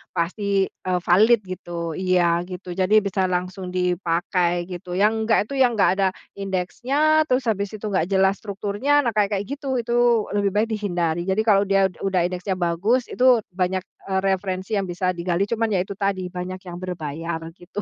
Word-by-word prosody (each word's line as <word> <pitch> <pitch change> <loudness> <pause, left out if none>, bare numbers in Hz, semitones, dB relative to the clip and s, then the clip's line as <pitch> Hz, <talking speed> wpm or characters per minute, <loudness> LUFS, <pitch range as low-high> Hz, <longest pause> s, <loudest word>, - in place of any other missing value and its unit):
pasti, 195 +3 0
eee, 180 -1 -2
valid, 210 +5 +5
gitu. 175 -2 -5
Iya, 175 0 +2
gitu, 180 0 -7
jadi 185 +4 +1
bisa 190 -1 0
langsung 185 +1 -3
dipakai 175 -1 0
gitu. 180 0 -6
Yang 205 +3 +4 0.2
enggak 225 - +4
itu - - -3
yang 245 -3 +4
enggak 200 - +4
ada 195 - +4 0.3
indeksnya, 260 +12 +1
terus 255 -1 +1
habis 200 -1 -2
itu 215 - -12
enggak 180 -4 +1
jelas 190 0 +2
strukturnya, 210 +8 0
nah 235 - +1
kayak 210 -1 +1
kayak 195 - -1 0.2
gitu, 270 -3 -2
itu 240 -1 +2
lebih 200 -1 0
baik 215 +2 +2
dihindari. 175 -5 -1
Jadi 190 +3 +2
kalau 205 -2 +3
dia 195 -1 +3
ud 175 - -21
udah 190 -3 +1
indeksnya 180 +2 -2
bagus 185 +8 0
itu 250 -3 +4
banyak, 185 0 -1 0.2
eee, 190 -1 +1
referensi 190 0 -1
yang 195 - -3
bisa 180 +1 -1
digali, 175 +1 -1
cuman 225 +2 0
ya 195 - +2
itu 195 +1 -6
tadi 195 -2 -1
banyak 185 +1 -6
yang 175 -1 -6
berbayar, 165 -2 -4 0.2
gitu. 185 +4 -7
190 Hz, 180 wpm, -23 LUFS, 180-210 Hz, 0.3 s, valid